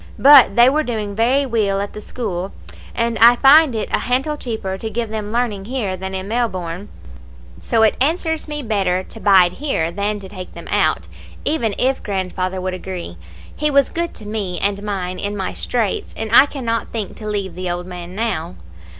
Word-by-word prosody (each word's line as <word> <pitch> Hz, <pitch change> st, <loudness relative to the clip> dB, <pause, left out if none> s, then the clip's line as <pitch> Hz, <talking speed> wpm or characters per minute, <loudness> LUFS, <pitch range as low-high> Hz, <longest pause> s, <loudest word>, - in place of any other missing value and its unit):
But 275 Hz, -7 st, +7 dB
they 240 Hz, +1 st, +7 dB
were 295 Hz, +4 st, +3 dB
doing 215 Hz, -7 st, -3 dB
very 250 Hz, +6 st, +2 dB
weel 215 Hz, -6 st, 0 dB
at 200 Hz, 0 st, -4 dB
the 210 Hz, -, -8 dB
school, 195 Hz, -6 st, -4 dB, 0.4 s
and 230 Hz, -1 st, 0 dB
I 235 Hz, +2 st, +8 dB
find 275 Hz, +1 st, +6 dB
it 215 Hz, -, -2 dB
a -, -, +3 dB
hantle 265 Hz, +5 st, -1 dB
cheaper 220 Hz, -8 st, -4 dB
to 220 Hz, +3 st, -5 dB
give 230 Hz, 0 st, -3 dB
them 215 Hz, -1 st, -4 dB
learning 225 Hz, -5 st, -1 dB
here 220 Hz, -6 st, -2 dB
than 190 Hz, +1 st, -6 dB
in 190 Hz, 0 st, -4 dB
Melbourne; 200 Hz, -5 st, -3 dB, 0.7 s
so 225 Hz, -1 st, +2 dB
it 220 Hz, -, +3 dB
answers 320 Hz, +2 st, 0 dB
me 295 Hz, -1 st, -4 dB
better 195 Hz, -5 st, 0 dB
to 225 Hz, -, -9 dB
bide 190 Hz, -4 st, +5 dB
here 220 Hz, -, -1 dB
than 205 Hz, +3 st, -2 dB
to 195 Hz, -, -9 dB
take 185 Hz, -2 st, -9 dB
them -, -, -10 dB
out, -, -, +1 dB, 0.4 s
even 235 Hz, -9 st, 0 dB
if 265 Hz, +1 st, +1 dB
grandfather 185 Hz, -1 st, -3 dB
would 185 Hz, 0 st, -3 dB
agree. 185 Hz, -, -6 dB, 0.4 s
He 300 Hz, +1 st, 0 dB
was 280 Hz, -2 st, +3 dB
good 340 Hz, 0 st, -3 dB
to 215 Hz, -, -10 dB
me 205 Hz, -4 st, -3 dB
and 200 Hz, 0 st, 0 dB
mine 185 Hz, -3 st, -4 dB
in 205 Hz, 0 st, -3 dB
my 190 Hz, -, -3 dB
straits, 230 Hz, -5 st, -2 dB
and 220 Hz, -1 st, -4 dB
I 270 Hz, +4 st, +8 dB
cannot 230 Hz, -5 st, -3 dB
think 215 Hz, -4 st, -5 dB
to 215 Hz, -, -7 dB
leave 200 Hz, -4 st, -3 dB
the 180 Hz, +1 st, -4 dB
old 175 Hz, 0 st, -3 dB
man 180 Hz, 0 st, -8 dB
now. 185 Hz, -6 st, -2 dB
210 Hz, 195 wpm, -19 LUFS, 190-245 Hz, 0.7 s, I